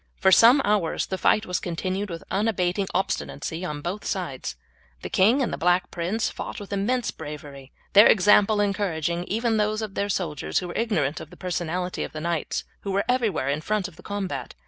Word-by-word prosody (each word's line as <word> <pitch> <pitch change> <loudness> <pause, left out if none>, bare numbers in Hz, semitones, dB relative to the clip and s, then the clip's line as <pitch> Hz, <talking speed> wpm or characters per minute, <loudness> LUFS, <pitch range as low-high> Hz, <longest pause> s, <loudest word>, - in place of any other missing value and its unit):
For 190 -2 +4
some 245 +8 +7
hours 205 -5 +1
the 190 - -3
fight 215 - +3
was 180 -2 -1
continued 185 +3 -3
with 165 -1 -6
unabating 195 -2 0
obstinacy 185 -2 -2
on 150 -5 -4
both 185 +7 -4
sides. 135 - -3 0.5
The - - -5
king 230 +9 +4
and - - -2
the - - -4
Black 180 +1 +2
Prince 185 +6 -1
fought - - -6
with 205 -1 -7
immense 230 +4 0
bravery, 145 -2 -9 0.2
their 205 +2 +9
example 205 +1 +5
encouraging 175 -4 -1
even 225 +3 0
those 215 +1 0
of 210 -3 -5
their 200 +1 -1
soldiers 165 -7 -2
who 180 - -1
were - - -7
ignorant 170 -11 0
of - - -9
the - - -15
personality 180 0 -2
of - - -7
the 155 - -5
knights 170 0 -2 0.2
who 200 - -6
were 195 +1 0
everywhere 230 - +1
in 145 +2 -1
front 210 +2 -1
of 185 - -14
the 180 - -14
combat. 200 -1 -4
190 Hz, 195 wpm, -25 LUFS, 170-210 Hz, 0.5 s, their